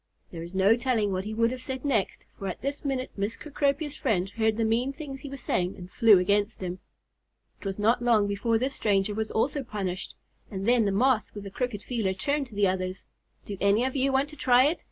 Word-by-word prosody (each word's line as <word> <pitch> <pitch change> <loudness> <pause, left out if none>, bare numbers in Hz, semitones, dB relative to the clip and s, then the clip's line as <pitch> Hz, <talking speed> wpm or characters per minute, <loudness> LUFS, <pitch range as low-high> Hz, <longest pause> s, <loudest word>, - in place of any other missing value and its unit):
There 165 - -7
is 170 +3 -8
no 195 +4 +5
telling 235 -4 0
what 185 +1 -2
he 215 - -4
would 230 +1 +2
have 255 0 -5
said 260 +1 -5
next, 225 -9 0
for 195 - -6
at 185 - -5
this 280 +1 -3
minute 265 -2 -2
Miss 205 +3 -2
Cecropia's 290 0 -1
friend 190 -2 0
heard 220 0 +1
the 230 - +1
mean 235 +4 +1
things 275 -2 -8
he 280 - -8
was 275 -1 -7
saying, 180 -4 -1
and 180 0 -10
flew 225 -4 +6
against 200 +2 +1
him. 180 0 -4 0.8
It - - -6
was 195 - -3
not 225 +4 +2
long 230 -4 +4
before 205 +3 +1
this 260 +4 -1
stranger 205 -3 +1 0.2
also 275 +6 0
was 265 - -7
punished, 190 -3 -4 0.3
and 195 0 -4
then 240 -2 +4
the 200 - +1
Moth 235 +2 +2
with 205 - -6
the 195 - -8
crooked 245 -2 -3
feeler 220 -7 -1
turned 280 +7 -1
to 225 - -14
the 205 0 +3
others. 185 0 -2 0.4
"Do 205 - -5
any 200 +4 +3
of 265 - -2
you 270 0 +2
want 270 +2 +1
to 300 - -11
try 255 -2 +5
it?" 300 +5 +1
225 Hz, 235 wpm, -27 LUFS, 195-260 Hz, 0.8 s, flew